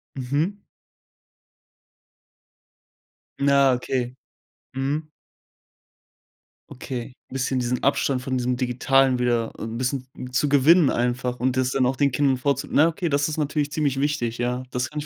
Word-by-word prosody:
Mhm. 145 Hz, +9 st, -1 dB, 2.8 s
Na, 140 Hz, -1 st, +4 dB
okay, 125 Hz, 0 st, -2 dB, 0.6 s
mhm. 145 Hz, +4 st, -2 dB, 1.6 s
Okay. 125 Hz, -1 st, -6 dB, 0.2 s
Bisschen 130 Hz, 0 st, -1 dB
diesen 125 Hz, 0 st, -2 dB
Abstand 135 Hz, -1 st, +1 dB
von 130 Hz, 0 st, -1 dB
diesem 125 Hz, 0 st, -1 dB
Digitalen 130 Hz, +1 st, +2 dB
wieder 120 Hz, -2 st, 0 dB
’n 115 Hz, +1 st, -5 dB
bisschen 130 Hz, +1 st, -2 dB, 0.2 s
zu 140 Hz, +3 st, +1 dB
gewinnen 145 Hz, +3 st, +5 dB
einfach 125 Hz, +1 st, -1 dB
und 130 Hz, +1 st, 0 dB
das 130 Hz, -1 st, +1 dB
dann 130 Hz, -1 st, +2 dB
auch 130 Hz, -, +1 dB
den 140 Hz, +1 st, +2 dB
Kindern 135 Hz, 0 st, +2 dB
vorzu 140 Hz, +1 st, -1 dB
na, 155 Hz, -, +5 dB
okay, 170 Hz, +1 st, -2 dB
das 145 Hz, +1 st, +1 dB
ist 155 Hz, -, -4 dB
natürlich 150 Hz, -1 st, -1 dB
ziemlich 145 Hz, -3 st, 0 dB
wichtig, 135 Hz, -5 st, -1 dB
ja, 125 Hz, +1 st, -1 dB
das 125 Hz, +1 st, -2 dB
kann 150 Hz, -, -5 dB
ich 145 Hz, -, -5 dB
130 Hz, 140 wpm, -24 LUFS, 125-145 Hz, 2.8 s, gewinnen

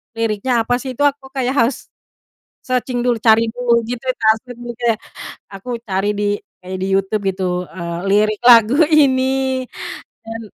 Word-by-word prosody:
liriknya 225 Hz, +2 st, 0 dB
apa 245 Hz, +2 st, 0 dB
sih, 260 Hz, 0 st, -5 dB
itu 285 Hz, -, -1 dB
aku 280 Hz, -1 st, 0 dB
harus 255 Hz, -1 st, 0 dB, 0.7 s
searching 250 Hz, -1 st, -2 dB
dulu, 245 Hz, -1 st, +1 dB
cari 225 Hz, 0 st, +4 dB
dulu 240 Hz, 0 st, +1 dB
gitu 245 Hz, +1 st, -5 dB
translate 225 Hz, +2 st, 0 dB
juga. 240 Hz, 0 st, -3 dB, 0.7 s
Aku 235 Hz, +5 st, -5 dB
cari 200 Hz, -2 st, -1 dB
di 205 Hz, 0 st, 0 dB, 0.3 s
kayak 185 Hz, 0 st, -7 dB
di -, -, -1 dB
YouTube 195 Hz, +2 st, -1 dB
gitu, 180 Hz, -1 st, -2 dB
eee, 170 Hz, -1 st, -5 dB
lirik 210 Hz, +1 st, +2 dB
lagu 235 Hz, 0 st, +7 dB, 0.2 s
ini 265 Hz, -2 st, +2 dB, 0.6 s
dan 225 Hz, 0 st, -6 dB
235 Hz, 140 wpm, -18 LUFS, 210-255 Hz, 0.7 s, lagu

